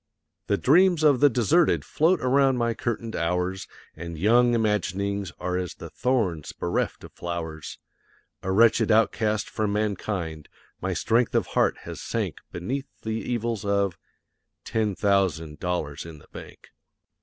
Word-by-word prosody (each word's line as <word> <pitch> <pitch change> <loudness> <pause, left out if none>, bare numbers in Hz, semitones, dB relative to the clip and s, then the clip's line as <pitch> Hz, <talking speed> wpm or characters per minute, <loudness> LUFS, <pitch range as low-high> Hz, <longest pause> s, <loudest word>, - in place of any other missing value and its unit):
The 100 - +2
dreams 175 - +4
of 145 -4 +5
the 145 - +6
deserted 140 - +2
float 165 +2 +2
around 135 0 +3
my 120 -1 +1
curtained 115 0 -3
hours, 90 +3 -1 0.3
And 85 0 -7
young 120 +7 +4
imaginings 100 -3 -1
are 90 0 -1
as 90 -2 -4
the - - -10
thorns 110 - -1
bereft 85 - -2
of - - -11
flowers; 80 -3 -5 0.6
A 95 - -2
wretched 115 +4 +4
outcast 110 -1 +2
from 105 -2 -2
mankind, 100 -7 -3 0.3
my - - -2
strength 115 +1 +1
of - - +3
heart - - +2
has - - -7
sank - - -3
Beneath 130 +11 -4 0.2
the 110 - -3
evils 115 -1 -2
of 100 -3 +1 0.7
ten 110 -3 0
thousand 90 -7 0
dollars 80 -5 -3
in 80 -2 -10
the - - -18
bank. - - -12
105 Hz, 145 wpm, -25 LUFS, 90-120 Hz, 0.7 s, the